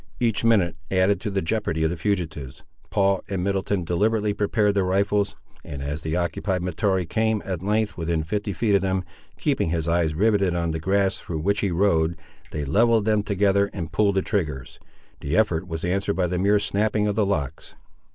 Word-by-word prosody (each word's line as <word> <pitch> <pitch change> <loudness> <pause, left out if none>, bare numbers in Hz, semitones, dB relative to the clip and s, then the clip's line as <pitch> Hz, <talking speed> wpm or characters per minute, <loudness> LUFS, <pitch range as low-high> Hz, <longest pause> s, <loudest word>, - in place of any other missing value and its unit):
Each 115 -3 0
minute 105 -7 +3
added 95 0 +2
to 110 - -2
the 95 -2 -1
jeopardy 85 -4 -1
of 80 - +2
the - - -2
fugitives. 80 -7 -3 0.3
Paul 100 -2 +2
and 95 -3 -2
Middleton 100 -1 0
deliberately 105 +5 +1
prepared 105 0 +1
their 100 -1 +1
rifles, 100 +2 +1 0.3
and 70 -1 -6
as 75 +2 -3
the 80 +1 -2
occupied 90 +1 -1
Mahtoree 90 +1 0
came, 110 +5 0
at 90 -3 -3
length, 105 +1 0
within 80 -1 -1
fifty 100 +5 -2
feet 105 +2 0
of 100 - +4
them, 95 -1 0 0.3
keeping - - 0
his 80 -1 -1
eyes 85 -2 +1
riveted 100 -1 +2
on 85 -1 0
the 80 - -3
grass 95 +3 +1
through 80 -3 -5
which 100 +5 +1
he 100 - 0
rode, 85 -2 +2 0.3
they 75 -1 -4
levelled 110 - +3
them 110 -1 +2
together 100 0 +2
and 80 -2 -5
pulled 100 -2 +2
the 95 - +2
triggers. 75 - -3 0.4
The 70 +4 -1
effort 90 -5 +1
was 80 -1 -4
answered 100 +3 0
by 95 - +1
the 90 0 -1
mere 100 +2 +4
snapping 105 +1 0
of 105 - +1
the 110 +1 +1
locks. 75 -10 -3
95 Hz, 195 wpm, -24 LUFS, 85-105 Hz, 0.4 s, of